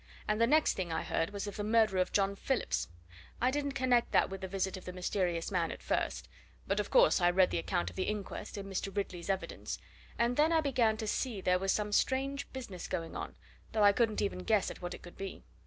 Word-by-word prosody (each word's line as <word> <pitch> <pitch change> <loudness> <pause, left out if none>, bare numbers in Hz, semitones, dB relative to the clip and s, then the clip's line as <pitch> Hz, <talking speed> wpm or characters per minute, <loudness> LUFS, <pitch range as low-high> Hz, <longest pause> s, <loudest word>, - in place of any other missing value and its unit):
And 215 +1 +1
the 230 - +5
next 305 +4 +4
thing 180 -3 -3
I 160 - -1
heard 165 - 0
was 200 0 -4
of 205 - -6
the 205 - -2
murder 215 -3 +3
of 185 - +1
John 200 0 +2
Phillips. 265 +4 -1 0.5
I 250 +2 +3
didn't 285 0 -1
connect 255 -3 +2
that - - +4
with 195 0 -6
the 190 - -3
visit 190 0 -1
of 185 - -9
the 180 - -5
mysterious 180 -2 -1
man 175 -3 +1
at - - -9
first; - - -1 0.4
but - - 0
of - - -1
course - - +5
I 175 - +5
read 185 +1 +4
the 85 - 0
account 85 +1 -1
of - - -17
the - - -1
inquest, 210 0 -4
and 195 -1 -5
Mr. 195 +1 -4
Ridley's 185 -3 -3
evidence, 195 -1 -3 0.4
and 235 +1 +1
then 310 +2 +4
I 325 - +4
began 245 -7 +2
to 220 - -4
see 225 0 -1
there 180 -1 +2
was 195 0 +1
some 210 0 0
strange 275 +5 0
business 235 -9 -6
going 165 -3 -4
on, - - -5 0.4
though 215 -2 +3
I 205 - +8
couldn't 225 -1 +1
even 200 -2 -2
guess 200 +1 +1
at - - -11
what 175 0 -4
it - - -14
could 175 - -12
be. 195 0 -6
200 Hz, 240 wpm, -32 LUFS, 185-235 Hz, 0.5 s, I